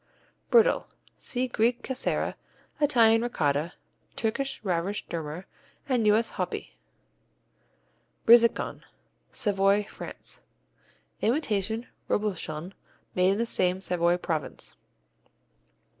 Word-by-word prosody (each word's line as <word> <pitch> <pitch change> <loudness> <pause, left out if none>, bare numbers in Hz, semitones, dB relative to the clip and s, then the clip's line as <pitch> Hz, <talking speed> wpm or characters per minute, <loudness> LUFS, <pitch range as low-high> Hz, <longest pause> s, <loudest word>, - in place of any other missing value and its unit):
Brittle 475 +1 +4 0.3
see 255 0 -1
Greek 240 0 +1
Cashera, 260 -1 -1 0.5
Italian 230 -6 +5
Ricotta, 155 -8 0 0.4
Turkish 270 +5 -2
Rarush 185 +1 -1
Durmar, 165 +2 -5 0.4
and 245 -5 +2
U.S. 220 +2 +3
Hopi. - - -3 1.5
Brizecon 235 0 +5 0.5
Savoy, 200 -1 +2
France - - -9 0.8
Imitation 225 - 0 0.2
Reblochon 185 -4 -2 0.4
made 185 +1 +3
in - - -2
the 230 - +1
same 185 -4 +1
Savoy 175 -2 +1
province. 160 -4 -4
210 Hz, 85 wpm, -27 LUFS, 180-235 Hz, 1.5 s, Italian